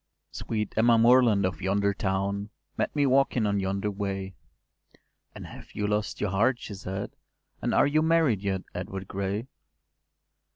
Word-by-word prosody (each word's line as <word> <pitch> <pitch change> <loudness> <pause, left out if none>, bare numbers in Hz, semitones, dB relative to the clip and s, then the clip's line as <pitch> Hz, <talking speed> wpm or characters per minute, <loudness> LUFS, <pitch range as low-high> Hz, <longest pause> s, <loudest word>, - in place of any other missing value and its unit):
Sweet 105 -2 -3
Emma 115 +1 +5
Moreland 115 -4 +5
of 95 +1 -3
yonder 100 +2 +1
town 100 +1 -2 0.3
Met - - -2
me 145 -1 +3
walking 130 -3 +2
on 100 -1 +1
yonder 100 +2 -1
way, 95 -1 -4 1.0
“And - - -8
have - - -12
you 105 - -1
lost 105 0 -1
your 105 - -1
heart?” 115 +6 +2
she 110 - -8
said; 95 +1 -6 0.5
“And - - -1
are - - +4
you 150 +2 +2
married 160 - +2
yet, 95 -2 -2
Edward 95 +1 -6
Gray? 100 +3 -3
100 Hz, 155 wpm, -27 LUFS, 95-115 Hz, 1.0 s, Emma